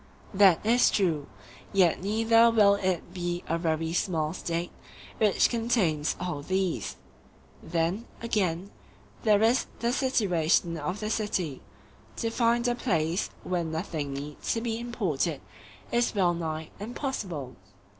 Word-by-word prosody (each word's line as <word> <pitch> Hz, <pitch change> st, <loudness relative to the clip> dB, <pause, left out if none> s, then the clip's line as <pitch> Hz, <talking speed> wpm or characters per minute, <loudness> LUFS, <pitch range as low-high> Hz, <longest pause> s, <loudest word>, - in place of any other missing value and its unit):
That 195 Hz, -2 st, +5 dB
is 240 Hz, +3 st, +5 dB
true; 165 Hz, -8 st, 0 dB, 0.4 s
yet 185 Hz, -5 st, +3 dB
neither 225 Hz, +3 st, +4 dB
will 210 Hz, -3 st, +5 dB
it 185 Hz, -3 st, -2 dB
be 175 Hz, -1 st, -3 dB
a 165 Hz, +1 st, -1 dB
very 160 Hz, -1 st, -1 dB
small 160 Hz, -3 st, 0 dB
State 170 Hz, -1 st, -3 dB, 0.5 s
which 210 Hz, -3 st, +4 dB
contains 215 Hz, -11 st, +1 dB
all 175 Hz, -5 st, -3 dB
these. 170 Hz, -, -1 dB, 0.7 s
Then, 170 Hz, +7 st, -1 dB
again, 195 Hz, -5 st, -1 dB, 0.5 s
there 215 Hz, -2 st, +4 dB
is 235 Hz, +3 st, +3 dB
the 235 Hz, +1 st, 0 dB
situation 180 Hz, -, +2 dB
of 170 Hz, +6 st, -4 dB
the 215 Hz, 0 st, -2 dB
city—to 210 Hz, -, -4 dB
find 235 Hz, +1 st, +2 dB
a 245 Hz, -, +2 dB
place 175 Hz, -7 st, 0 dB
where 180 Hz, -2 st, -1 dB
nothing 160 Hz, -3 st, -3 dB
need 145 Hz, +1 st, -6 dB, 0.3 s
be 230 Hz, -1 st, -2 dB
imported 180 Hz, -, -1 dB, 0.5 s
is 240 Hz, -1 st, +1 dB
wellnigh 170 Hz, -4 st, 0 dB
impossible. 200 Hz, -, -4 dB
185 Hz, 120 wpm, -28 LUFS, 165-225 Hz, 0.7 s, That